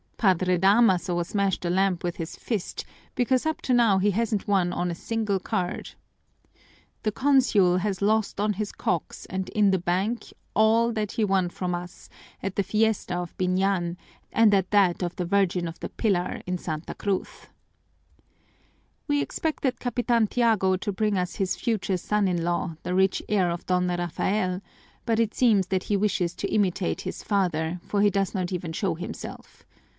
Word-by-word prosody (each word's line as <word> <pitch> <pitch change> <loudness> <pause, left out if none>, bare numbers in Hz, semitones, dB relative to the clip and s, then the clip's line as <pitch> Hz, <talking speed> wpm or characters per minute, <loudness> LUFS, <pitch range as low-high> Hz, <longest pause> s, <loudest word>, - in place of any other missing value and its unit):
Padre 185 -3 +3
Damaso 190 -3 +3
smashed 195 0 -1
a - - 0
lamp 185 0 +1
with 175 -1 -2
his 165 -1 -5
fist 215 -6 -4 0.3
because 255 +2 +1
up 315 0 -1
to 255 - +1
now 230 -5 +4
he 200 +2 +2
hasn't 220 0 -1
won 190 -3 +2
on 180 0 -1
a - - -4
single 215 0 -1
card. 185 -2 -3 1.1
The 215 - 0
Consul 240 -9 +3
has 195 0 -2
lost 215 -1 +1
on 210 +1 +1
his 205 +1 -3
cocks 175 -3 -3
and 190 0 -4
in 205 -2 +3
the 190 - +2
bank 190 +7 -1 0.2
all 225 +2 +4
that 215 -3 -2
he 225 - 0
won 190 -3 +1
from 180 0 -3
us 175 0 -7 0.3
at 195 -1 -3
the - - +2
fiesta 210 -2 0
of 175 -1 -5
Biñan 185 -1 +1 0.4
and 220 -2 +5
at 190 -2 +2
that 195 -4 +3
of 175 -1 -2
the 180 - -2
Virgin 185 -2 +1
of 165 - -8
the - - -5
Pillar 190 -6 -1
in 180 0 -2
Santa 155 -1 -5
Cruz. 200 -2 -3 1.6
"We 290 -1 +2
expected 285 -5 -2
Capitan 240 -2 +1
Tiago 215 -6 +2
to 205 +3 -3
bring 210 +1 0
us 180 -1 -2
his 190 -2 0
future 200 -5 -1
son 210 +2 0
in 175 -2 0
law, 170 -1 -1
the 180 - -2
rich 190 0 +2
heir 190 -4 +2
of 170 0 -4
Don 180 0 +1
Rafael, 180 +2 -1 0.4
but 230 -1 +1
it 225 -1 +1
seems 210 -7 +3
that 185 -1 0
he 205 - +1
wishes 185 -4 0
to - - -3
imitate 195 -3 0
his - - -6
father, 175 -4 0
for 205 - -1
he 205 - +5
does 195 +1 -1
not 185 -1 -2
even 175 -3 -3
show 180 +2 -1
himself. 170 +3 -8
195 Hz, 175 wpm, -26 LUFS, 180-215 Hz, 1.6 s, and